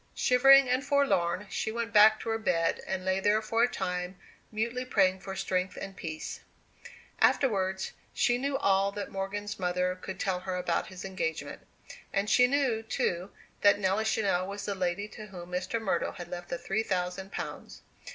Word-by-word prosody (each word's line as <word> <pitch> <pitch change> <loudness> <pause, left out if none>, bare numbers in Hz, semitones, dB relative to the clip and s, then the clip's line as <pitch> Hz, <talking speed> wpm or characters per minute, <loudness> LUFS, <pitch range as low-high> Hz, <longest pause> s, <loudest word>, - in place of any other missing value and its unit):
Shivering 270 +2 +6
and 255 +2 +1
forlorn, 210 - +1
she 220 - -2
went 230 -1 -3
back 215 +1 +7
to 230 - -4
her 225 0 0
bed, 165 -6 +1
and 185 -1 -3
lay 190 0 +1
there 205 +2 +3
for 225 +1 0
a 240 - +6
time, 180 -3 -3 0.3
mutely 235 +3 -2
praying 190 -6 +2
for 190 0 -7
strength 185 -1 -1
and 195 - -7
peace. 155 -3 -6 0.8
Afterwards, 190 -7 +2 0.2
she 245 0 +2
knew 275 +1 -1
all 195 -2 +2
that 205 0 -5
Morgan's 200 +2 -4
mother 180 0 0
could 190 +1 -8
tell 185 -2 0
her 185 0 -4
about 180 -2 -1
his 185 -1 -9
engagement. 165 -4 -4 0.5
And 200 0 0
she 250 0 +6
knew, 260 -4 +1
too, 185 -4 -2 0.3
that 205 0 +6
Nelly 200 +2 +1
Channell 195 -4 +1
was 200 +1 -6
the 205 - -1
lady 185 +2 -2
to 215 0 -10
whom 180 -3 -10
Mr. 185 +5 -2
Myrtle 220 -4 -1
had 175 -1 -8
left 175 0 -7
the 175 - -2
three 195 +5 -1
thousand 190 -1 -3
pounds. - - -7
195 Hz, 180 wpm, -29 LUFS, 180-220 Hz, 0.8 s, back